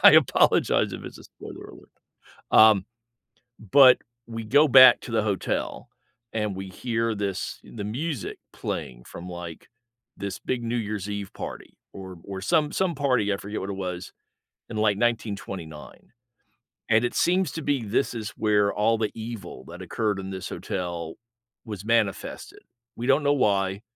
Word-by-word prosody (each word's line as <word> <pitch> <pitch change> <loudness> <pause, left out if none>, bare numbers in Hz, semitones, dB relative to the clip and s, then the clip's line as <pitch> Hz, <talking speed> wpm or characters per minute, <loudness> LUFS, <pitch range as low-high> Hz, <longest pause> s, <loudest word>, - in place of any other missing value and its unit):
I - - +10
apologize - - +4
if - - -7
it's - - -9
a - - -14
spoiler - - -11
alert. - - -15 0.6
Um, 110 -3 +7 0.9
but 130 -3 +8 0.3
we 115 -1 -5
go 145 +7 +5
back 130 -2 +9
to 120 - -8
the 110 - +2
hotel, 100 -4 -2 0.4
and 105 -3 -1
we 95 0 -6
hear 115 +2 -1
this 100 -3 -3
the 105 - -8
music 130 +5 -4
playing - - -5
from, 90 +1 -9
like, 85 -2 -8 0.5
this 100 0 -5
big 125 -2 -3
New 115 +1 -2
Year's 105 -3 -3
Eve 100 -2 -5
party - - -8 0.2
or 95 -1 -9
or 95 -1 -6
some 150 - +2
some 185 -3 0
party, 125 -7 +1
I 100 - 0
forget 105 +2 -5
what 95 - -5
it 100 - -2
was, 90 -2 -5 0.6
in, 110 - -4
like, 105 -2 +3
1929. 100 -8 -4 0.8
And 115 +2 +4
it - - -3
seems 180 -2 +2
to 160 - -4
be 140 -4 0
this 115 +6 0
is 110 -3 -5
where 105 -2 +2
all 110 +2 +2
the 110 -2 -1
evil 115 -1 -7
that 90 +2 -9
occurred 105 +2 -1
in 95 0 -6
this 95 -1 -5
hotel 85 -3 -4 0.5
was 105 -3 -7
manifested. 115 -4 -1 0.3
We 120 - -4
don't 140 +2 +4
know 145 - +3
why. 100 -6 +1
105 Hz, 165 wpm, -25 LUFS, 95-120 Hz, 0.9 s, I